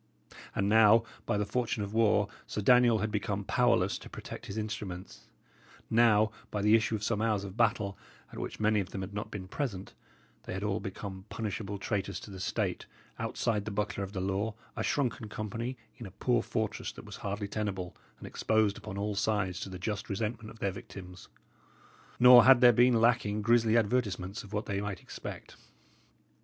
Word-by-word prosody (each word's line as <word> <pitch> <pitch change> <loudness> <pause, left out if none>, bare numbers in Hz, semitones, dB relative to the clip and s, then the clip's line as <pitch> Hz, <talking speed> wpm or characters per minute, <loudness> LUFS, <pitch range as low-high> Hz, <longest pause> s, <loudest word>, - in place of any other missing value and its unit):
And 100 - +1
now, 110 +1 +6 0.2
by - - +1
the 105 - 0
fortune 115 0 -1
of 100 +1 -6
war, 105 -2 +3 0.2
Sir 105 - -3
Daniel 125 +1 +5
had 110 - -4
become 100 -1 -2
powerless 115 -4 +2
to - - -11
protect - - -8
his 100 - -6
instruments; 105 -4 -6 0.6
now, 110 -2 +5 0.2
by 105 -1 -2
the 105 +1 +5
issue 115 0 +3
of 105 - -5
some 110 -1 0
hours 110 -3 +1
of 95 -1 -7
battle, 105 -4 +1 0.3
at - - -7
which - - -5
many 110 0 +3
of 95 -2 -3
them 95 - -5
had 95 +1 -6
not 105 - -4
been 95 -3 -7
present, 95 -5 -4 0.5
they - - -5
had 95 - -4
all 105 -2 0
become 95 0 -7
punishable 105 -2 -4
traitors 100 -1 -2
to 105 - -10
the 95 - -8
State, - - -2 0.3
outside 110 -4 -1
the - - -3
buckler 105 -1 -2
of 95 - -6
the 95 - -3
law, 100 +3 -1 0.2
a - - -3
shrunken 125 -5 -1
company 115 +5 -4 0.2
in 115 - -6
a - - -9
poor 120 +5 +1
fortress 110 -2 -3
that - - -11
was - - -9
hardly 100 0 -3
tenable, 100 -4 -3 0.2
and - - -11
exposed 110 -2 +1
upon 105 -2 -7
all 105 +1 -1
sides 100 -3 0
to - - -5
the 95 - -7
just 105 +5 -4
resentment 110 +2 -3
of 115 - -12
their 100 -3 -1
victims. 90 -1 -10 0.9
Nor 125 -1 +9
had 130 -1 +8
there 120 -1 +7
been 120 0 +5
lacking 110 -3 +2
grisly 115 0 +4
advertisements 105 -4 0
of 100 - -13
what 105 0 -2
they 100 -1 -2
might 100 -3 -4
expect. - - -8
105 Hz, 190 wpm, -30 LUFS, 100-115 Hz, 0.9 s, Nor